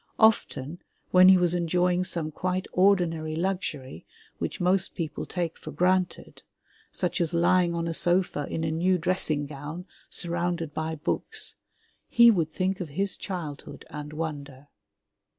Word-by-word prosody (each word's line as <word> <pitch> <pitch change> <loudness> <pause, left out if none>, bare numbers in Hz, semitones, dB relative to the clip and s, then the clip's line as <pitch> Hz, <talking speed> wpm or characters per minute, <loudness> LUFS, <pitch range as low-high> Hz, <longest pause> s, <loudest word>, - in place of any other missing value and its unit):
Often, 175 - +2 0.3
when 185 0 +8
he 190 - +8
was 175 -1 +2
enjoying 180 +1 +1
some 165 -4 -1
quite 185 +3 -2
ordinary 175 -5 +2
luxury 160 - -3 0.4
which - - -4
most 185 +1 +1
people 160 -4 -4
take 175 -2 -3
for - - -9
granted, 185 0 0 0.5
such 180 -1 -1
as 170 0 0
lying 175 0 +3
on 170 0 -2
a 165 - -2
sofa 175 -4 +1
in 160 - -3
a 160 - -1
new 180 +3 +2
dressing 165 -4 0
gown, 150 +5 -7 0.2
surrounded 170 -2 -2
by 160 0 -3
books, 150 - -1 0.5
he 235 0 +7
would 165 -7 0
think 185 +4 -1
of 175 -4 -5
his 195 +7 0
childhood 165 -7 -7
and 150 0 -7
wonder. 145 -3 -6
170 Hz, 145 wpm, -27 LUFS, 155-185 Hz, 0.5 s, when